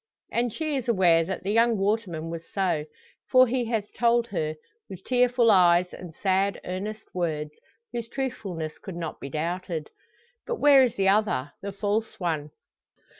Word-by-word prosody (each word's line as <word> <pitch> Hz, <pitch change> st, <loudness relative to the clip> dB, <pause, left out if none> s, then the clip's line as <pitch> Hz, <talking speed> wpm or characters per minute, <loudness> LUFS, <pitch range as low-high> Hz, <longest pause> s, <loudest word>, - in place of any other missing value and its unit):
And 240 Hz, 0 st, 0 dB
she 310 Hz, +3 st, -2 dB
is 260 Hz, -3 st, -3 dB
aware 175 Hz, -6 st, +4 dB
that 190 Hz, +2 st, -4 dB
the 195 Hz, -, -1 dB
young 230 Hz, +1 st, +3 dB
waterman 195 Hz, -6 st, -1 dB
was 165 Hz, 0 st, -7 dB
so. 180 Hz, -6 st, 0 dB, 0.4 s
For 255 Hz, 0 st, +7 dB
he 250 Hz, 0 st, -1 dB
has 220 Hz, -3 st, -2 dB
told 235 Hz, 0 st, +2 dB
her, 155 Hz, -5 st, -2 dB, 0.3 s
with 190 Hz, -, -9 dB
tearful 245 Hz, -2 st, +3 dB
eyes 180 Hz, -2 st, +4 dB
and 180 Hz, -2 st, -9 dB
sad, 195 Hz, 0 st, +1 dB
earnest 200 Hz, +4 st, -5 dB
words, 155 Hz, -4 st, -2 dB, 0.4 s
whose 235 Hz, -1 st, -4 dB
truthfulness 195 Hz, -, -4 dB
could 190 Hz, -, -8 dB
not 165 Hz, -2 st, -5 dB
be 140 Hz, -, -7 dB
doubted. 165 Hz, +1 st, -3 dB, 0.6 s
But 480 Hz, -, -1 dB
where 290 Hz, -, +6 dB
is 245 Hz, -3 st, 0 dB
the 195 Hz, -1 st, +2 dB
other, 195 Hz, -10 st, +1 dB
the 200 Hz, -, -4 dB
false 205 Hz, +2 st, -2 dB
one? 160 Hz, -5 st, -2 dB
195 Hz, 165 wpm, -26 LUFS, 170-230 Hz, 0.6 s, For